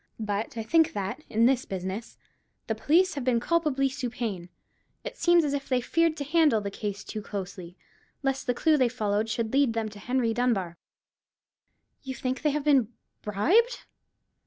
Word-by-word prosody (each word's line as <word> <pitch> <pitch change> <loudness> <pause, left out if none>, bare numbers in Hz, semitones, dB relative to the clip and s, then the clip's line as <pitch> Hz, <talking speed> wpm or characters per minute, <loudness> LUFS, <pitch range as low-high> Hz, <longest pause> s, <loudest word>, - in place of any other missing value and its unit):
But 210 +1 -3
I 225 - -2
think 320 +7 +3
that, 200 +8 -4
in 225 +2 +3
this 260 0 +3
business, 190 +4 -5 0.5
the 220 - -1
police 335 - +3
have 280 - -4
been 245 -2 +2
culpably 295 -2 +1
supine. 240 -9 -4 0.5
It - - -6
seems 345 -2 +4
as 285 - -1
if 280 -1 -4
they 255 -2 +2
feared 330 +5 +1
to 285 - -3
handle 300 -5 +3
the 200 -1 -5
case 205 -1 -5
to 215 - -6
closely, 185 -3 -7 0.5
lest 270 0 -1
the 245 - +1
clue 310 +4 +3
they 255 -3 +3
followed 215 -2 -1
should 220 +1 -2
lead 275 -4 +3
them 225 -1 -2
to 205 -1 -12
Henry 245 +1 0
Dunbar." 220 -8 0 1.3
"You 265 -1 -6
think 255 0 -3
they 305 - +2
have 295 0 -1
been 270 -6 +3 0.3
bribed?" 365 - +2
245 Hz, 175 wpm, -27 LUFS, 210-285 Hz, 1.3 s, seems